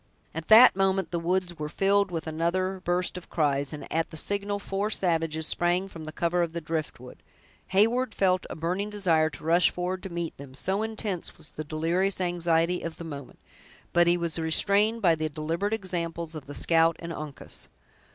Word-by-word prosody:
At 165 0 -6
that 225 +1 +9
moment 190 -2 +1
the 170 - -1
woods 175 0 -1
were 150 0 -3
filled 200 +3 +2
with 165 -3 -4
another 180 +4 -1
burst 180 +1 0
of 175 - -19
cries, 140 -3 0
and 150 - -7
at 165 0 0
the 160 - -8
signal 200 +4 0
four 200 +1 -2
savages 165 -5 0
sprang 175 +4 +1
from 165 -4 -9
the 155 - -6
cover 170 +2 0
of 170 -1 -1
the 170 - -2
driftwood. 155 -6 -5 0.5
Heyward 225 +5 +2
felt 185 -1 +2
a - - -5
burning 180 +6 -2
desire 170 -7 +2
to 145 - -11
rush 170 +3 +4
forward 180 +1 -3
to 190 - -6
meet 170 -1 -4
them, 135 -1 -11
so 190 +8 -1
intense 215 -5 -4
was 160 - -11
the 155 - -6
delirious 165 +6 0
anxiety 175 -1 +1
of 165 -1 -6
the - - -7
moment; 145 -5 -8 0.6
but 175 0 +5
he 175 +1 +4
was 170 -1 -1
restrained 200 +7 +3
by 170 -3 +6
the 155 -1 -2
deliberate 165 +7 -2
examples 170 -5 -3
of 155 -3 -7
the 145 - -6
scout 165 0 +3
and 170 0 -6
Uncas. 150 -2 -4
170 Hz, 190 wpm, -27 LUFS, 160-190 Hz, 0.6 s, that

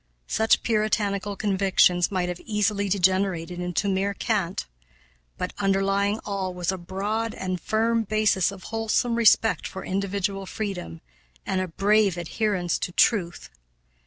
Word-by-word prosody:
Such 220 +1 +2
puritanical 210 -2 0
convictions 190 -3 +3
might 185 -2 0
have 180 -1 -4
easily 210 -2 0
degenerated 185 -2 +1
into 180 +3 -1
mere 195 +1 0
cant; 195 -7 -1 0.7
but - - -3
underlying 195 +1 +1
all 190 -3 -3
was 180 0 -1
a 190 - -4
broad 205 +6 -3
and 185 -2 -3
firm 225 +1 +1
basis 210 -3 +2
of 195 -1 -11
wholesome 225 +2 +1
respect 225 -1 +3
for 190 - -8
individual 195 0 -2
freedom 180 - -5 0.4
and 185 - 0
a 185 - -2
brave 200 +1 +2
adherence 180 0 -1
to - - -3
truth. 175 - +1
195 Hz, 130 wpm, -25 LUFS, 185-210 Hz, 0.7 s, convictions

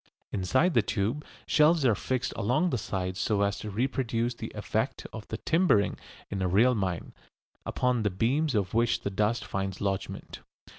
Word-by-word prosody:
Inside 130 - +2
the 115 - +5
tube, 105 +8 -1 0.2
shelves 155 -1 +4
are 120 - +5
fixed 130 +4 -2
along 130 - +1
the - - +1
sides 95 -2 -3
so 100 0 +1
as 100 0 0
to 110 - -5
reproduce 120 +1 -1
the 115 - -7
effect - - -2
of - - -8
the - - -4
timbering 165 - +2 0.4
in 100 -2 -2
a 95 - +1
real 110 +8 +4
mine, 95 -7 -2 0.5
upon 125 -2 +1
the 105 - +1
beams 130 +9 +1
of 100 -4 0
which 115 +1 +2
the 100 - -3
dust 105 +4 0
finds 95 -1 -3
lodgment. 100 -1 -3
110 Hz, 170 wpm, -28 LUFS, 100-130 Hz, 0.5 s, the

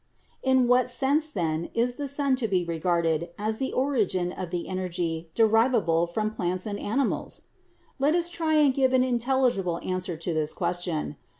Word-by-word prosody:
"In 260 -2 +3
what 250 +1 +3
sense, 285 +5 +1
then, 165 - -2
is 240 +2 +1
the 285 +3 -5
sun 280 -1 +1
to 240 -3 -1
be 185 -4 0
regarded 170 0 0
as 215 +1 -2
the 265 - -1
origin 210 -10 0
of 185 -1 -6
the 175 -1 -3
energy 175 -3 -3
derivable 225 -7 +3
from 215 +5 -2
plants 180 -3 -2
and 205 -1 -4
animals? 260 +7 -2 0.6
Let 290 +4 +3
us 345 -1 +1
try 325 -2 0
and 295 -3 +5
give 260 -1 +2
an 255 -1 +4
intelligible 240 -8 +1
answer 185 -2 -3
to 165 +1 -3
this 155 -1 -1
question. 175 -4 -2
210 Hz, 170 wpm, -26 LUFS, 175-260 Hz, 0.6 s, and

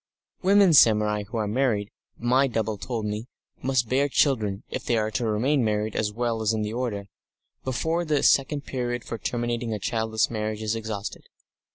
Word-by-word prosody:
Women 195 -1 +5
samurai 105 -5 +5
who 115 - -5
are 110 -2 0
married, 105 -3 0 0.3
my 130 +3 +3
double 110 -3 -1
told 115 -2 -3
me, 105 +3 -3 0.3
must 130 -2 +1
bear 140 +4 +2
children 110 -9 +1
if - - -4
they 120 - +1
are 110 0 0
to 115 +1 -1
remain 125 +6 +2
married 105 -1 -1
as 105 -1 0
well 115 0 -1
as 110 0 +1
in 110 -1 -1
the 105 +1 -3
order 115 -5 -3 0.6
before 160 +7 -1
the 150 -4 0
second 140 +1 +3
period 120 -3 -3
for 115 - -6
terminating 120 -1 -2
a - - -5
childless 110 +1 0
marriage 110 -1 -3
is 110 +1 0
exhausted. 110 -2 -5
115 Hz, 180 wpm, -25 LUFS, 105-130 Hz, 0.6 s, Women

